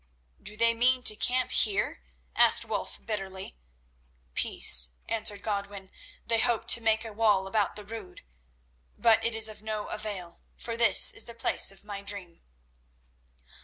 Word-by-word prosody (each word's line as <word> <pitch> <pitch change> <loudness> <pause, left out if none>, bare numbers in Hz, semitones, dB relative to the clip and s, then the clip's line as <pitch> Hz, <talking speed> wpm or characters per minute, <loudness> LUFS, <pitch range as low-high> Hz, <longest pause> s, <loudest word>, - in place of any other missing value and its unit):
"Do 210 +1 -13
they 230 +1 +3
mean 250 +2 0
to 215 - +3
camp 250 +3 -2
here?" 200 - -1 0.3
asked - - +5
Wulf - - -7
bitterly. 195 -3 -7 0.8
"Peace," 60 0 +3
answered 210 -3 -1
Godwin; 200 -2 -6 0.3
"they 230 -1 0
hope 235 -1 -1
to 235 - +6
make 220 0 0
a 220 - -9
wall 205 -3 0
about 200 0 -2
the 210 0 -10
Rood. 215 -3 -11 0.7
But 225 -1 +2
it 230 0 -2
is 225 0 +3
of 215 -1 -9
no 215 -1 -6
avail, 190 -5 -8 0.2
for 230 - -7
this 235 0 +8
is - - -3
the 235 - -12
place 230 - +1
of 195 +1 -15
my 200 -1 -8
dream." 200 -4 -8
215 Hz, 155 wpm, -26 LUFS, 200-230 Hz, 0.8 s, this